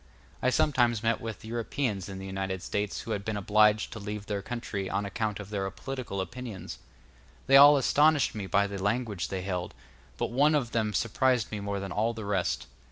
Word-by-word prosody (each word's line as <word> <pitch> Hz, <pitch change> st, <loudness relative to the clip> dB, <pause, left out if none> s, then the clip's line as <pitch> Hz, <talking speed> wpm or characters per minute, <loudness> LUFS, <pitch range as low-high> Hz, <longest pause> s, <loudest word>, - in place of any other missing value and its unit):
I 130 Hz, -, +3 dB
sometimes 120 Hz, -4 st, +2 dB
met 115 Hz, 0 st, +1 dB
with 110 Hz, -1 st, -6 dB
Europeans 115 Hz, -3 st, -2 dB
in 95 Hz, -, -6 dB
the 95 Hz, -, -7 dB
United 95 Hz, -1 st, -3 dB
States 105 Hz, 0 st, -2 dB
who 115 Hz, -, -6 dB
had 100 Hz, -2 st, -2 dB
been 110 Hz, 0 st, -2 dB
obliged 105 Hz, +1 st, +3 dB
to 110 Hz, -, -7 dB
leave 105 Hz, 0 st, -5 dB
their 100 Hz, -1 st, -2 dB
own -, -, -10 dB
country 110 Hz, -5 st, -4 dB
on 100 Hz, +1 st, -1 dB
account 105 Hz, +1 st, -2 dB
of 105 Hz, 0 st, -8 dB
their 95 Hz, -2 st, -1 dB
political 100 Hz, +1 st, -5 dB
opinions. 105 Hz, 0 st, -7 dB, 0.7 s
They 135 Hz, -, +5 dB
all 145 Hz, +1 st, +9 dB
astonished 145 Hz, +2 st, +3 dB
me 105 Hz, -3 st, -5 dB
by 100 Hz, +1 st, +3 dB
the 100 Hz, -1 st, -5 dB
language 100 Hz, -, -1 dB
they 95 Hz, +1 st, -4 dB
held, 90 Hz, -2 st, -3 dB, 0.4 s
but -, -, -2 dB
one 145 Hz, +5 st, +4 dB
of 125 Hz, -6 st, 0 dB
them 110 Hz, -3 st, 0 dB
surprised 125 Hz, +1 st, +1 dB
me 105 Hz, -, -3 dB
more 100 Hz, 0 st, -3 dB
than 95 Hz, -1 st, -5 dB
all 110 Hz, +5 st, 0 dB
the 110 Hz, -2 st, -6 dB
rest. 100 Hz, -3 st, -1 dB
105 Hz, 205 wpm, -29 LUFS, 100-120 Hz, 0.7 s, all